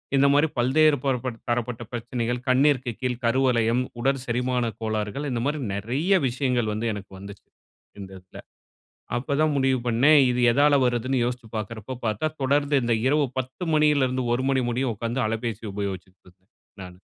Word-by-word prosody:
இந்த 140 +1 +4
மாதிரி 145 +3 +4
பல்வேறு 145 +4 +4
பரப்ப 130 -2 -1 0.2
தரப்பட்ட 120 0 -2
பிரச்சனைகள். 120 0 -3
கண்ணீருக்கு 130 -1 +2
கீழ் 125 -1 -2
கருவளையம், 120 -1 +2 0.2
உடற் 135 +2 0
செரிமான 125 0 -1
கோளாறுகள் 110 +5 -3
இந்த 120 -2 -2
மாதிரி 150 +2 -1
நிறைய 135 - +1
விஷயங்கள் 125 -3 -1
வந்து 115 +2 -2
எனக்கு 100 -1 -9
வந்துச்சு 100 0 -11 0.5
இந்த 95 - -9
இதுல. 90 - -14 0.8
அப்போ 125 +3 -3
தா 155 - +4
முடிவு 135 -1 +2
பண்ணேன் 130 +6 +5
இது 125 0 0
எதால 145 +3 +4
வருதுன்னு 125 +1 0
யோசித்து 120 -1 -4
பார்க்கிறப்போ 110 +3 -5
பார்த்தா, 110 +7 -1 0.2
தொடர்ந்து 145 +2 +2
இந்த 120 -1 +2
இரவு 145 0 +2
10:00 130 +7 -4
மணியிலிருந்து 140 -4 +2
1:00 130 +2 -2
மணி 135 -1 +1
முடியும் 125 +1 -1
உட்கார்ந்து 115 +5 -3
அலைபேசி 115 0 -3
உபயோகிச்சிட்டு 95 -2 -6
இருந்தேன் 95 +3 -23 0.3
நான். 90 -1 -11
125 Hz, 155 wpm, -24 LUFS, 115-135 Hz, 0.8 s, பண்ணேன்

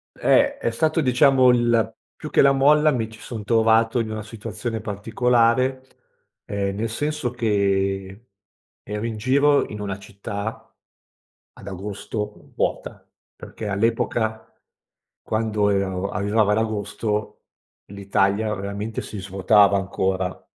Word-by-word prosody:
Eh, - - +3
è - - 0
stato, 155 +7 +1
diciamo, 130 0 +4
l 120 -2 +2 0.2
più - - -8
che - - +4
la 140 - +6
molla 150 +3 +4
mi 115 -5 -2
ci 110 - -14
son 110 -3 -7
trovato 115 +1 +3
in 110 -1 -2
una 110 0 -4
situazione 110 +1 -5
particolare, 115 +4 +1 0.6
ehm, 100 -1 -2
nel 110 +3 -2
senso 145 +1 -2
che 100 -2 -1 0.6
ero 105 +1 -4
in 110 -2 -5
giro 140 +5 +3
in 105 0 -7
una 100 -1 -4
città, 100 +2 -7 0.8
ad 100 - -14
agosto, 105 +2 -6
vuota, - - -3 0.3
perché 110 - -8
all'epoca 110 +1 -1 0.7
quando 110 -2 0
e 100 -1 +2
o 95 +1 -3
arrivava 105 +1 +1
ad 105 - +2
agosto, 110 -1 -3 0.5
l'Italia 100 +2 0
veramente 100 +3 -5
si 105 - -8
svuotava 100 +1 +4
ancora. 95 -1 -2
110 Hz, 125 wpm, -23 LUFS, 100-115 Hz, 0.8 s, la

